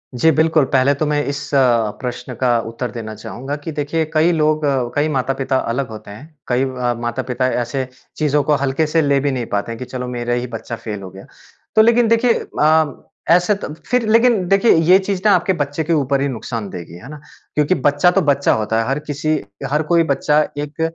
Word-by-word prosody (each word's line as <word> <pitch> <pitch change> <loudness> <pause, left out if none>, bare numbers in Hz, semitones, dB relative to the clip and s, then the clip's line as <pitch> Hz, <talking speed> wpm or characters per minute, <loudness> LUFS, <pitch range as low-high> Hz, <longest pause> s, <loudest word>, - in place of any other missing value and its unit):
जी, 145 +7 +3
बिल्कुल। 160 -2 +3
पहले 135 +1 +4
तो - - +3
मैं 150 0 0
इस 140 +1 -3
अ, 120 -5 +3
प्रश्न 125 0 -5
का 120 0 +2
उत्तर 115 +1 -5
देना 110 -1 -6
चाहूँगा 130 +6 -6
कि 160 - -3
देखिए, 150 +2 -1
कई 160 +2 +3
लोग 155 -2 +1
अ, 135 -4 0
कई 145 +1 +2
माता-पिता 135 -1 -1 0.2
अलग 135 +1 -2
होते 110 -2 -10
हैं। 150 +10 -13
कई 125 +1 +1
अ, 125 -2 -1
माता-पिता 125 +1 -2 0.2
ऐसे 130 +1 -3 0.3
चीज़ों 150 -1 +1
को 150 +2 +2
हल्के 140 +4 0
से 160 +2 +2
ले 140 -2 +2
भी 140 +1 0
नहीं 125 -3 -3
पाते 100 +3 -1
हैं, 115 - -7
कि 125 - -5
चलो 125 0 -5
मेरा 120 -1 -3
ही 120 +1 -2
बच्चा 115 +1 -7
फेल 105 -3 -6
हो 95 - -8
गया। 95 +1 -13 0.5
तो 220 - +7
लेकिन 235 +1 +4
देखिए 230 +1 +3 0.3
अ, 155 -2 +2 0.2
ऐसे 180 +4 +4
तो 200 - -6 0.2
फिर 250 -2 0
लेकिन 230 -4 +3
देखिए, 195 +5 +4
ये 165 +3 +5
चीज़ 190 -1 -3
ना 210 - +6
आपके 180 +2 +1
बच्चे 145 -1 -2
के 165 +2 0
ऊपर 140 -3 +1
ही 140 - +1
नुकसान 115 -4 -5
देगी। 85 -3 -9
है 125 +9 -12
ना? 150 0 -9 0.4
क्योंकि 150 +4 +2
बच्चा 145 +5 +3
तो 195 - +2
बच्चा 140 0 +2
होता 110 +1 0
है। 115 - -3
हर 135 +3 0
किसी 150 +1 -2 0.4
हर 150 +1 +2
कोई 170 -1 +5
बच्चा 150 +2 +2 0.2
एक 145 +2 -5
140 Hz, 220 wpm, -18 LUFS, 125-160 Hz, 0.5 s, तो